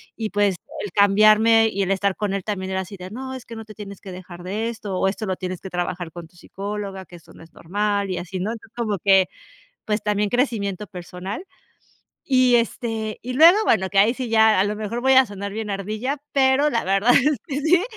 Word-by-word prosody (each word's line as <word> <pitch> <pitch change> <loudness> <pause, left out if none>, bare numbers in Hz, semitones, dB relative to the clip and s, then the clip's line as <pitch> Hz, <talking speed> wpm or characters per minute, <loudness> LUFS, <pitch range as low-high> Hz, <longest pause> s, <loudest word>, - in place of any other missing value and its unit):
y 220 -2 -3
pues, 205 -2 +1 0.3
el 205 - -5
cambiarme, 215 +2 +5
y 200 -1 -1
el 190 - -1
estar 195 0 +1
con 205 -2 -2
él, 195 -1 -2
también 190 -2 -4
era 190 0 -1
así 190 +1 -9
de: 185 +1 -9
"No, 260 +3 -6
es 255 -2 -8
que 230 - -9
no 225 0 -8
te 215 0 -13
tienes 200 -2 -9
que 190 - -9
dejar 180 -1 -10
de 210 +5 -3
esto". 210 -5 -5
O - - +2
esto 205 +3 -3
lo 190 -2 -1
tienes 185 -1 -5
que 190 - -7
trabajar 175 -1 -3
con 170 -1 -9
tu 170 - -29
psicóloga, 195 +1 -6
que 175 - -14
esto 170 - -16
no - - -14
es 165 - -19
normal, 200 +2 -1
y 180 - -2
así 185 +2 -5
¿no? 200 +5 -2
Entonces, 225 -2 -10
como 215 -4 -1
que, 195 -1 +4 0.6
pues, 210 0 -1
también 210 0 0
crecimiento 210 -6 -1
personal. 180 - -7 0.8
Y 255 -2 +4
este, 225 -2 -2
y 250 +1 -5
luego, 330 +8 +7
bueno, 190 -4 +2
que 195 0 +2
ahí 220 +4 +5
sí 255 -2 -4
ya, 220 -2 +5
a - - +4
lo 205 +1 -2
mejor 215 +3 -4
voy 265 +1 +4
a 260 0 +7
sonar 200 0 -6
bien 215 +1 -5
ardilla, 215 +8 -3
pero, 275 +2 +3
la 230 - 0
verdad 195 +5 +3
es 285 +2 +3
que 285 -1 -2
sí, 345 +4 +3
210 Hz, 235 wpm, -22 LUFS, 190-230 Hz, 0.8 s, luego